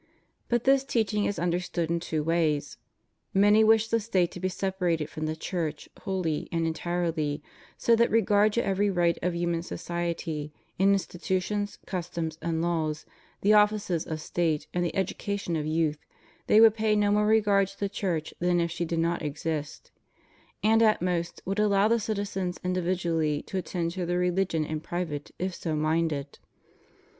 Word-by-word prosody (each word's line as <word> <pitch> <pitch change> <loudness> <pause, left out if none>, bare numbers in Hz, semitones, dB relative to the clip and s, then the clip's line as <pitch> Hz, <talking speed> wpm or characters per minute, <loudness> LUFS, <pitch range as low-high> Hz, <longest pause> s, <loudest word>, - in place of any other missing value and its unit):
But 240 -1 +1
this 270 0 +4
teaching 220 -5 0
is 205 - -1
understood 175 -1 -1
in 170 - +1
two 160 -2 -2
ways. 160 -2 0 0.6
Many 205 +3 +6
wish 220 0 +4
the 230 0 +1
State 190 -5 +1
to - - -8
be 185 +1 -1
separated 180 -4 -1
from 155 0 -3
the 155 - -2
Church 160 -2 -4
wholly 180 -6 -2
and 165 -1 0
entirely, 160 -3 -1 0.3
so 235 - +4
that 235 +1 +3
regard 210 -1 +3
to 235 - +1
every 200 +1 +1
right 175 -3 +1
of 180 0 -1
human 170 -1 0
society, 170 -3 -4 0.3
in 195 +1 +5
institutions, 190 +2 -2
customs, 170 -3 -4
and 165 -1 -1
laws, 160 -3 -1 0.4
the 205 +2 +4
offices 210 -5 +2
of 160 -1 -3
State, 160 -2 -1
and 175 - 0
the 175 - -2
education 195 -1 -2
of 155 -1 -2
youth, 155 -1 0 0.5
they 215 - +6
would 225 -1 +8
pay 215 -1 +1
no 205 -1 +2
more 210 0 +3
regard 205 -3 +4
to 195 - -14
the 200 - 0
Church 180 -6 -3
than 175 0 +2
if 170 0 0
she 170 +1 -2
did 165 0 -2
not 170 +1 0
exist; 150 0 -4 0.7
and, 220 +1 +4
at 215 -5 +4
most, 170 -2 -2
would 195 +2 -2
allow 205 -1 +4
the 230 +1 +3
citizens 200 -4 -3
individually 170 -4 0
to - - -9
attend 170 -2 -2
to 180 -1 -3
their 175 0 0
religion 180 -3 +1
in 155 0 -3
private 160 -3 -4
if 185 +1 -2
so 160 -2 -3
minded. 155 -2 -1
175 Hz, 170 wpm, -27 LUFS, 165-200 Hz, 0.7 s, would